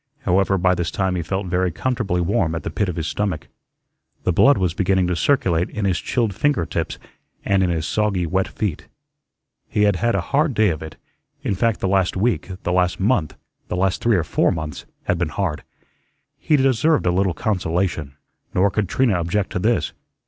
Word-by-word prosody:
However, 95 +2 +2
by 90 0 +3
this 85 -2 -1
time 95 -1 -1
he 90 - -1
felt 95 +4 -3
very 90 0 0
comfortably 105 -2 -1
warm 85 -3 +1
at 80 - -4
the - - -4
pit 105 -3 -1
of 90 - -4
his 80 - -3
stomach. 100 -3 -2 0.7
The 90 - +1
blood 140 +10 +5
was 90 -4 0
beginning 95 0 +1
to 90 0 0
circulate 90 - +1
in 105 -2 -3
his 90 -3 +1
chilled 115 -5 -1
finger 120 - +1
tips - - -3 0.5
and 100 -1 +2
in 90 - +2
his 80 -2 -1
soggy, 100 -2 0
wet 95 +3 0
feet. 100 -9 -4 0.8
He 105 - +1
had 100 -3 +3
had 120 +3 +1
a - - +1
hard 145 -2 +2
day 110 -1 +4
of 80 -2 -3
it; 80 -1 -8 0.5
in - - 0
fact, 110 +3 0
the - - +1
last 95 -1 +1
week, 110 +2 0
the 90 - -1
last 90 -1 +1
month, 95 - +1 0.3
the 90 - -3
last 95 0 +1
three 115 -2 +3
or 85 - +1
four - - +1
months, 80 -2 -5 0.2
had 85 - 0
been 85 -3 0
hard. 85 -1 -2 0.8
He 155 - +2
deserved 135 - +2
a 90 - +3
little 95 -1 +1
consolation. 85 -7 -1 0.4
Nor 95 +2 +3
could 105 -3 -1
Trina 130 -5 +2
object 90 +4 -1
to - - -2
this. 115 +5 +1
95 Hz, 200 wpm, -21 LUFS, 85-105 Hz, 0.8 s, blood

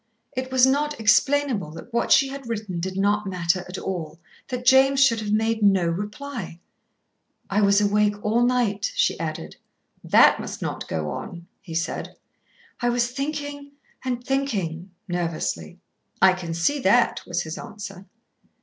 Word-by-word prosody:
It 255 0 -3
was 260 -1 +5
not 290 +1 0
explainable 245 - +2
that 235 +8 -11
what 235 - 0
she 275 - +6
had 270 -3 -8
written 210 -6 -3
did 185 +2 -4
not 205 +1 +1
matter 180 0 0
at 185 - -6
all, 165 -4 -5 0.3
that 250 -1 -5
James 265 +1 +5
should 230 -4 +2
have 210 -1 -3
made 220 +1 +1
no 195 -3 +4
reply. 205 +2 -4 0.9
"I 205 +2 +2
was 200 0 +5
awake 210 0 +2
all 225 +3 +2
night," 240 -5 +1
she - - +1
added. 155 - -5 0.5
"That - - +5
must - - -6
not - - -4
go 75 -2 -3
on," 170 -1 -7 0.2
he 165 - -8
said. 165 +2 -3 0.6
"I 240 - +1
was 240 0 +1
thinking 285 +1 -5 0.3
and 250 -2 -3
thinking," 195 -11 -2 0.2
nervously. 165 - -3 0.4
"I 190 -1 +6
can 170 -3 -5
see 285 +13 +1
that," 240 0 +3
was 175 0 -1
his 160 0 -6
answer. 195 -2 -9
210 Hz, 155 wpm, -24 LUFS, 180-255 Hz, 0.9 s, she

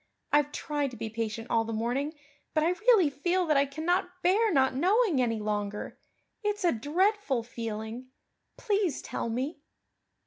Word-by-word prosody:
I've 295 0 +3
tried 290 -1 -2
to 245 - -10
be 220 0 -5
patient 225 0 -4
all 225 -1 +3
the 225 - -5
morning, 250 +8 -1 0.4
but 310 - +3
I 330 - +3
really 395 -4 +4
feel 350 +6 0
that 310 -2 +2
I 280 0 +4
cannot 330 +6 0
bear 410 +5 +4
not 265 -5 +3
knowing 365 - +3
any 230 -2 +1
longer. 210 -1 -3 0.4
It's 415 -1 -1
a 345 - +5
dreadful 305 - +1
feeling. 225 +1 -6 0.5
Please 405 - 0
tell - - -3
me." 265 +6 -3
285 Hz, 160 wpm, -29 LUFS, 230-360 Hz, 0.5 s, a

